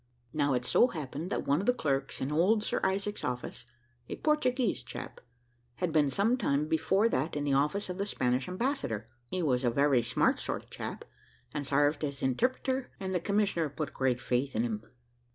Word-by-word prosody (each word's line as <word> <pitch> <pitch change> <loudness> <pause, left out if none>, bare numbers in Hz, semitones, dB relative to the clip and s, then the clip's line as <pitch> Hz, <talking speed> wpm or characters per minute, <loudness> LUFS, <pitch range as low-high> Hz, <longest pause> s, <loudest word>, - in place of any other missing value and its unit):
Now 145 -3 +2
it 125 0 -1
so 240 - +5
happened, 155 - -5
that - - -2
one 140 +2 +3
of 200 - -3
the 250 - +4
clerks 135 - -1
in 130 - -1
old 195 +8 +3
Sir - - -1
Isaac's 200 +2 0
office, 125 -1 -4 0.4
a - - -3
Portuguese 255 -7 +1
chap, - - -8 0.5
had 180 +2 -1
been 150 -3 +3
some 210 - +2
time 150 - +1
before 190 +7 +3
that 160 -8 -1
in 145 - -1
the 145 -1 +1
office 150 +9 +1
of 180 +1 -5
the 200 - -1
Spanish 125 -7 0
ambassador; 185 - -2 0.2
he 180 +6 -2
was 130 -4 +2
a 120 - +4
very 140 0 +3
smart 120 +2 +2
sort - - -3
of - - -25
a - - -34
chap, - - -6 0.5
and 145 -2 -3
sarved 145 +2 +2
as 140 -2 -3
interpreter, 255 - 0
and 190 -1 -3
the 180 - +2
commissioner 195 -4 +1
put 150 +1 -4
great 130 -2 +1
faith 130 +2 -1
in 110 - +2
him." 110 -2 -2
150 Hz, 200 wpm, -31 LUFS, 135-200 Hz, 0.5 s, so